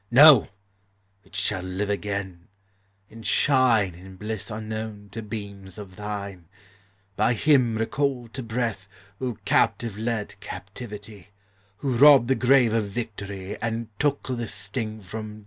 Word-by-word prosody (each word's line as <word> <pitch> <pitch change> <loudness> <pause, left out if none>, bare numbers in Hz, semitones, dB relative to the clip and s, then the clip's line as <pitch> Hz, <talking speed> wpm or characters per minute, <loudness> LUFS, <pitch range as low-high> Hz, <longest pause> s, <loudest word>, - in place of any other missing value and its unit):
No! 135 0 +9 0.8
it - - -16
shall 100 -3 +1
live 95 +3 -2
again, 100 -3 -4 0.6
and 115 +1 -11
shine 115 -4 +3
In 95 +2 -12
bliss 105 +2 -4
unknown 110 -1 -5
to 115 +2 -5
beams 100 -3 -7
of 100 -3 -9
thine, 100 -4 -6 0.7
By 110 +4 +2
Him 125 -3 +3
recalled 125 0 -1
to 130 - -4
breath, 115 -5 -2 0.3
Who 125 -3 -2
captive 110 -4 +1
led 110 -2 -3
captivity, 105 -1 -9 0.5
Who 130 +1 -1
robbed 135 -2 +8
the - - +5
grave 130 -3 +4
of 115 -2 +1
victory, 100 -3 -6
And 115 0 -2
took 145 -1 +1
the 120 -3 -2
sting 110 +2 -4
from 105 +2 -7
death! - - -12
110 Hz, 135 wpm, -25 LUFS, 100-120 Hz, 0.8 s, No